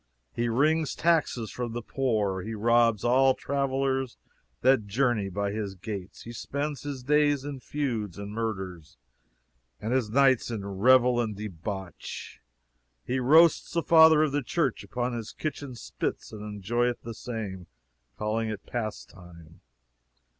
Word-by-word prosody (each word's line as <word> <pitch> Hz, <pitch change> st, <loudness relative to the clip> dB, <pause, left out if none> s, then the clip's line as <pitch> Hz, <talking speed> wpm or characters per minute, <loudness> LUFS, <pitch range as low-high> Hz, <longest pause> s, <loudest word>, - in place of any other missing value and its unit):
He 120 Hz, 0 st, -1 dB
wrings 155 Hz, +6 st, +2 dB
taxes 155 Hz, -9 st, +1 dB
from 120 Hz, -2 st, -4 dB
the 120 Hz, -1 st, -4 dB
poor; 110 Hz, -8 st, 0 dB
he 110 Hz, +3 st, -5 dB
robs 115 Hz, 0 st, +3 dB
all 130 Hz, +2 st, +4 dB
travelers 135 Hz, -2 st, -1 dB, 0.4 s
that 130 Hz, -6 st, +4 dB
journey 110 Hz, -2 st, +1 dB
by 100 Hz, +1 st, -2 dB
his 100 Hz, -2 st, -4 dB
gates; 95 Hz, 0 st, -7 dB
he 120 Hz, -, -8 dB
spends 145 Hz, +4 st, -4 dB
his 140 Hz, -3 st, -6 dB
days 145 Hz, 0 st, +2 dB
in 145 Hz, -2 st, -5 dB
feuds 120 Hz, -, -3 dB
and 100 Hz, 0 st, -6 dB
murders, 95 Hz, -7 st, -5 dB, 0.8 s
and 110 Hz, +3 st, -2 dB
his 130 Hz, -5 st, +1 dB
nights 130 Hz, 0 st, +3 dB
in 110 Hz, -4 st, -4 dB
revel 120 Hz, +5 st, +4 dB
and 110 Hz, -3 st, -3 dB
debauch; 95 Hz, -2 st, -7 dB, 0.6 s
he 130 Hz, +1 st, -1 dB
roasts 160 Hz, +6 st, +5 dB
the 170 Hz, -, +1 dB
fathers 160 Hz, -2 st, +7 dB
of -, -, -9 dB
the 145 Hz, +1 st, 0 dB
church 165 Hz, +6 st, -1 dB
upon 125 Hz, 0 st, -3 dB
his 115 Hz, -2 st, -5 dB
kitchen 145 Hz, -4 st, -5 dB
spits, 115 Hz, -, -4 dB
and 110 Hz, -, -8 dB
enjoyeth 115 Hz, +4 st, -1 dB
the 115 Hz, -, -6 dB
same, 105 Hz, -6 st, -6 dB, 0.5 s
calling 110 Hz, +1 st, -1 dB
it 105 Hz, -2 st, -6 dB
pastime. 90 Hz, -7 st, -7 dB
120 Hz, 140 wpm, -28 LUFS, 105-135 Hz, 0.8 s, fathers